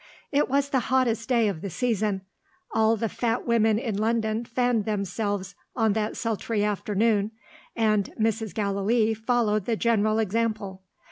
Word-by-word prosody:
It 290 -1 +2
was 280 +1 +1
the 265 - +2
hottest 245 -3 +1
day 235 -3 +3
of 185 -6 -3
the 200 - -4
season. 215 -2 0 0.5
All 220 0 +3
the 225 - -1
fat 230 +2 -1
women 225 -2 +3
in 225 -3 -2
London 220 +1 0
fanned 240 -2 0
themselves 200 -1 -2 0.2
on 225 -4 +2
that 215 0 -2
sultry 225 -2 -1
afternoon; 210 0 +1 0.5
and 215 -3 +1
Mrs. 220 -3 0
Gallilee 215 +2 +1
followed 220 -2 0
the 230 - 0
general 215 -1 +2
example. 215 -3 -1
220 Hz, 145 wpm, -26 LUFS, 210-230 Hz, 0.5 s, day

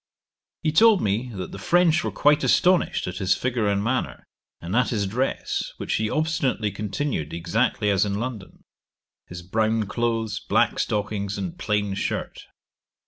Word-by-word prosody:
He 155 - +2
told 220 +4 +6
me, 110 +5 -1
that 95 -2 -5
the 100 - -8
French 175 - +3
were - - -2
quite 150 +1 +3
astonished 180 0 +3
at 90 0 -5
his 95 -1 +2
figure 120 -4 -1
and 100 0 +1
manner, 125 +3 -2 0.4
and 90 +5 -4
at 125 0 +3
his 105 -4 0
dress, 125 +7 -2
which - - -3
he 110 0 -1
obstinately 140 -9 0
continued 105 - -3
exactly 105 +5 0
as 95 -1 +3
in 100 -1 -1
London; 110 -3 -6 0.6
his 85 0 -8
brown 110 +4 +1
clothes, 115 0 -2
black - - +1
stockings, 105 -1 -2
and 175 -1 -5
plain 105 -5 0
shirt. - - -4
110 Hz, 155 wpm, -24 LUFS, 100-130 Hz, 0.6 s, told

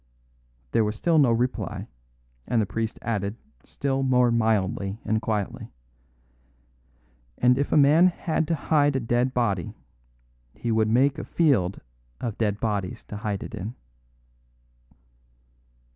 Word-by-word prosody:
There 115 - +3
was 105 0 -2
still 165 +7 +2
no 135 -5 +5
reply, 120 +2 -2 0.6
and 120 - +1
the 110 - +2
priest 115 +3 -3
added 100 -2 -2 0.3
still 135 -1 -2
more 125 -2 +3
mildly 105 -3 0
and 110 0 0
quietly: 105 -3 -3 1.7
"And 125 +1 +4
if 140 +2 -1
a - - +4
man 150 +5 +6
had 165 -3 -1
to 165 - +1
hide 145 -2 +2
a - - +2
dead 120 +2 +1
body, 100 -8 -1 0.8
he 120 - -3
would 110 -1 +2
make 135 +5 +3
a - - -4
field 120 - +1 0.4
of 115 -4 -4
dead 105 -2 0
bodies 110 +1 -2
to 105 - -5
hide 105 -2 -3
it - - -9
in." 110 +3 -6
115 Hz, 135 wpm, -25 LUFS, 105-135 Hz, 1.7 s, man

